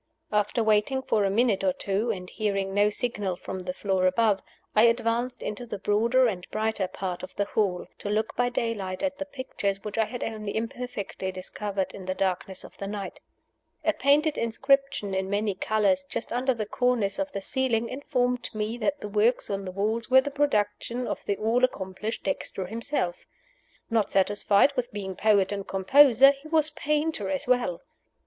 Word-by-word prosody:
After 210 +2 +1
waiting 220 +5 +2
for 215 -5 +1
a 195 - +2
minute 210 -1 +2
or 185 -1 +3
two, 200 +6 -1
and 185 -5 -3
hearing 195 -2 -2
no 205 +1 +4
signal 210 -4 -2
from 190 +1 -6
the 180 0 -4
floor 190 -2 +1
above, 205 +1 +2 0.3
I 215 +2 +7
advanced 235 +1 +1
into 240 +4 -5
the 210 - -4
broader 230 +6 +3
and 185 -6 -2
brighter 215 -3 -1
part 180 -1 -4
of 185 - -9
the 205 - 0
hall, 195 -4 0
to 205 - -4
look 215 +1 -1
by 245 0 +2
daylight 215 -5 -2
at 280 0 -1
the 290 - -4
pictures 205 -8 -3
which 210 +1 -4
I 220 - +4
had 245 +3 -5
only 215 -2 -4
imperfectly 230 -5 -4
discovered 190 +1 -3
in 190 - -9
the 185 - -1
darkness 190 0 -2
of - - -12
the 195 - -4
night. 200 -1 -5 0.7
A 320 - +3
painted 295 +3 +3
inscription 270 -2 +1
in 190 0 -1
many 205 0 0
colors, 220 +8 +1
just - - -4
under 255 +1 +1
the 215 -2 -3
cornice 240 -1 0
of 290 0 -2
the - - -2
ceiling, 235 0 0
informed 250 -2 -1
me 215 +3 -2
that 285 +6 -1
the - - -4
works 215 +3 +2
on 195 0 -3
the 185 - -4
walls 215 +5 -1
were 260 0 +7
the 285 - -4
production 245 -3 0
of - - -4
the 200 - 0
all 230 +4 +1
accomplished 205 -2 -2
Dexter 195 -9 -3
himself. 220 -3 -2 0.6
Not 225 -3 +2
satisfied 205 +6 +3
with 250 0 -2
being 195 -3 -5
poet 205 -2 +3
and 200 -1 -4
composer, 265 +6 +6
he 280 +2 -11
was 310 -1 +2
painter 300 -8 -1
as 190 -1 -2
well. 245 -9 +1
215 Hz, 185 wpm, -27 LUFS, 195-250 Hz, 0.7 s, I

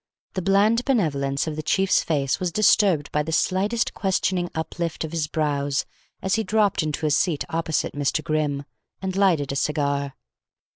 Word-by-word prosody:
The 185 - -2
bland 205 +6 +3
benevolence 140 - 0
of 155 -2 -4
the 155 - -3
chief's 190 +5 +2
face 140 -2 0
was 180 -2 -1
disturbed 190 -6 +3
by 150 - +1
the 160 +2 -4
slightest 200 +7 +1
questioning 185 -2 0
uplift 165 +1 -3
of 160 - -5
his 165 -2 -1
brows 145 -3 -1 0.4
as 190 - 0
he 220 - +2
dropped 210 -3 +2
into 155 0 -2
a 150 - +2
seat 150 +1 +1
opposite 160 -1 -1
Mr. 145 +2 -1
Grimm, 150 -2 -1 0.4
and 190 -1 -4
lighted 175 -8 +2
a - - -3
cigar. 140 -1 -1
160 Hz, 165 wpm, -24 LUFS, 145-190 Hz, 0.4 s, bland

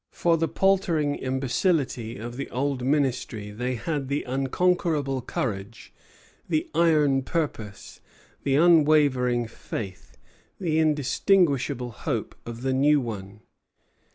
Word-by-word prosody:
For 170 -1 +1
the 165 0 0
paltering 175 -7 +1
imbecility 130 - -1
of 120 +1 -7
the 140 +2 -5
old 135 +1 -1
Ministry 125 -6 -1
they 125 +4 -3
had 145 0 -3
the 140 +2 -1
unconquerable 140 +1 0
courage, 110 -3 -5 0.6
the 315 +3 0
iron 150 -5 +3
purpose, 130 - -4 0.4
the 135 - +1
unwavering 145 -7 +4
faith, 100 -4 -8 0.4
the 160 -4 0
inextinguishable 150 -3 +2
hope, - - -3
of 115 +1 -7
the 130 0 +1
new 145 +3 +4
one. 105 -4 -6
135 Hz, 110 wpm, -25 LUFS, 120-155 Hz, 0.6 s, unwavering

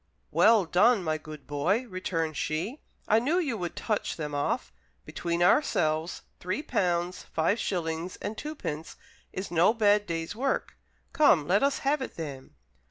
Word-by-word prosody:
"Well 220 -4 +5
done, 200 +5 +4
my 155 -1 -1
good 155 -1 -10
boy," 175 - 0
returned 165 -5 -2
she, 170 - -2 0.3
"I 220 - +5
knew 290 +9 +1
you 295 -10 0
would 175 -1 -4
touch 215 -3 -2
them 150 -2 -5
off. 145 - -1 0.3
Between 170 +2 -1
ourselves, 160 - +2 0.2
three 185 +11 -3
pounds, 175 - 0
five 165 +8 0
shillings, 170 -1 -2
and 220 - -5
twopence 215 - -5 0.4
is 190 0 -5
no 175 +7 +4
bad 205 -2 +3
day's 165 +2 -3
work. 265 +4 -1 0.4
Come, 290 - +4
let 195 +4 +3
us 280 0 +2
have 285 +1 +2
it 260 - -5
then." 140 - -7
180 Hz, 155 wpm, -28 LUFS, 160-225 Hz, 0.4 s, Well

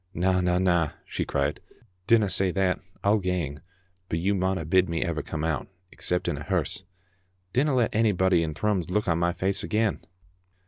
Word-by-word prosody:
"Na, 90 +2 +2
na, 90 0 +2
na," 85 -4 +2
she - - -3
cried, 70 +1 -1 0.5
"dinna 115 -3 +5
say 95 0 +2
that; 90 -1 +1 0.2
I'll 105 +2 +4
gang, 90 -7 -2 0.5
but 80 - 0
you 95 +5 +1
mauna 95 -3 0
bid 95 +3 +3
me 85 0 0
ever 85 -4 -2
come 80 +1 -5
out, 80 -2 -1 0.2
except 90 0 -1
in - - -1
a - - -6
hearse. - - -1 0.7
Dinna 135 +2 +2
let 120 -3 +2
onybody 95 -5 +3
in 80 -2 -2
Thrums 95 -1 0
look 105 +3 0
on 85 -1 +2
my 85 0 +2
face 95 +3 -1
again." 110 -1 0
90 Hz, 180 wpm, -26 LUFS, 85-100 Hz, 0.7 s, dinna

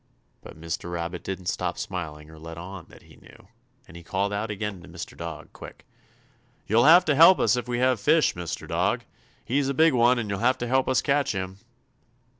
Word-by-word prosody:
But - - -13
Mr. 85 +1 -5
Rabbit 85 +1 -4
didn't 95 -1 -6
stop - - -2
smiling 75 -4 -6
or 80 - -14
let 80 +1 -9
on 90 0 -9
that - - -17
he - - -19
knew, - - -18 0.4
and - - -15
he 85 - -9
called 100 +4 -2
out 105 +2 -3
again 105 -2 -4
to - - -14
Mr. - - -8
Dog, 85 -2 -8
quick: - - -12 0.8
"You'll 115 +4 +3
have 175 +4 +7
to 155 - +2
help 165 +6 +7
us - - +2
if 125 -1 -4
we 120 -1 -2
have 130 -1 +2
fish, 155 +9 +3
Mr. 85 -1 -6
Dog! - - 0 0.4
He's 135 +3 0
a 140 - -2
big 160 +1 +4
one 120 +1 +4
and 115 -3 -3
you'll 100 -1 -3
have 125 +4 +2
to 120 - -4
help 130 +2 +1
us 130 - +2
catch 140 -2 +1
him!" 95 0 -5
105 Hz, 215 wpm, -25 LUFS, 85-130 Hz, 0.8 s, have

